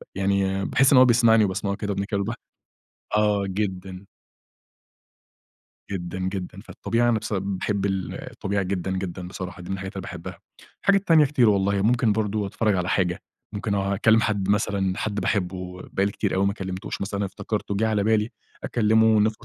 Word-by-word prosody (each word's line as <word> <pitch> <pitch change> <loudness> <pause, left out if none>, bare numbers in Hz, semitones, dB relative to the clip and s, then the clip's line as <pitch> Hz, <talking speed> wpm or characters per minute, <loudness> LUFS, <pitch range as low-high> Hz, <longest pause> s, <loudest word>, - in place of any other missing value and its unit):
يعني 95 0 0
باحس 135 +1 +3
إن 135 - +7
هو 130 - +9
بيسمعني 115 -2 +5
وباسمعه 100 +1 -2
كده 105 0 -3
وأنا 100 - -2
باتكلم 100 0 -2
مع - - 0
البحر 120 - -3 0.8
آه 105 -2 +2
جدًا. 95 -1 -4 1.8
جدًا، 90 -2 -4
جدًا، 95 0 -4
فالطبيعي 120 +1 -1
أنا 115 -2 +3
بس 110 - -6
باحب 100 +1 -1
ال 95 -2 -2 0.2
الطبيعة 100 0 -2
جدًا، 95 0 -2
جدًا، 95 -1 -4
بصراحة 90 -1 -7
دي 90 - -10
من 95 - 0
الحاجات 95 0 -6
اللي 95 - -4
باحبها، 85 -1 -8 0.4
الحاجة 200 0 +5
تانية 165 -6 +5
كتير 130 -5 +3
والله 100 -1 +2
ممكن 115 0 +3
برضه 105 -1 -1
أتفرج 105 +1 0
على 90 -1 -1
حاجة 90 -3 0 0.3
ممكن 105 0 -2
أكلم 100 +3 +3
حد 105 -4 -1
مثلًا 100 -2 +1
حد 110 - -2
باحبه 90 -2 -2
بقالي 100 +1 +1
كتير - - -1
أوي 95 +1 +2
ما 100 - +1
كلمتهوش, 95 -2 -5
مثلًا 100 0 -2
افتكرته 100 +1 -3
جيه 110 +3 +1
على 105 -2 +1
بالي 110 +1 +2 0.3
أكلمه 110 -1 +3
100 Hz, 170 wpm, -24 LUFS, 95-110 Hz, 1.8 s, هو